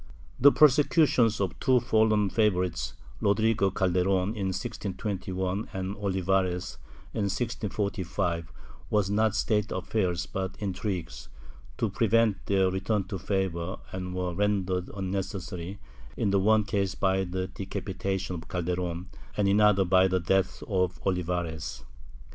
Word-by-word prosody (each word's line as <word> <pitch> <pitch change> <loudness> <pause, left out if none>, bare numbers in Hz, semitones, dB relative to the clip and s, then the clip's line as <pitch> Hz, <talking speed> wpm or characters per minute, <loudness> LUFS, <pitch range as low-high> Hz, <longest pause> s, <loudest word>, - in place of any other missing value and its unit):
^ - - -19 0.4
The 140 +3 +8
prosecutions 145 -6 +4
of 95 -2 +1
the - - -17
two 130 -1 +4
fallen 110 -3 +2
favorites, 90 - +1 0.3
Rodrigo 105 0 +3
Calderon, 95 0 +1
in 105 -3 -2
1621 95 +1 -3
and 95 +1 -3
Olivares, 95 -3 -1 0.3
in 105 - 0
1645, 100 -5 -2 0.4
were 105 -1 +3
not 110 0 +2
state 105 -1 +1
affairs 90 -2 -1
but 95 0 -4
intrigues, 90 - -4 0.5
to - - +1
prevent 115 -3 +2
their 95 -2 +3
return 95 +2 0
to 95 - -4
favor 95 -1 -2
and 90 -1 -5
were 90 -1 -2
rendered 95 -2 0
unnecessary, 95 -1 -4 0.4
in 105 -4 +1
the 100 - +3
one 110 +2 +4
case 100 -3 -1
by 95 0 +1
the 95 0 -3
decapitation 95 0 -3
of 85 -2 -7
Calderon 90 0 -2 0.3
and 105 -1 +2
in 100 +1 +4
the 105 - +6
other 100 -2 +3
by 95 +1 +5
the 95 0 +1
death 95 +2 0
of 90 -4 0
Olivares. 85 -3 -2
95 Hz, 135 wpm, -28 LUFS, 90-105 Hz, 0.5 s, The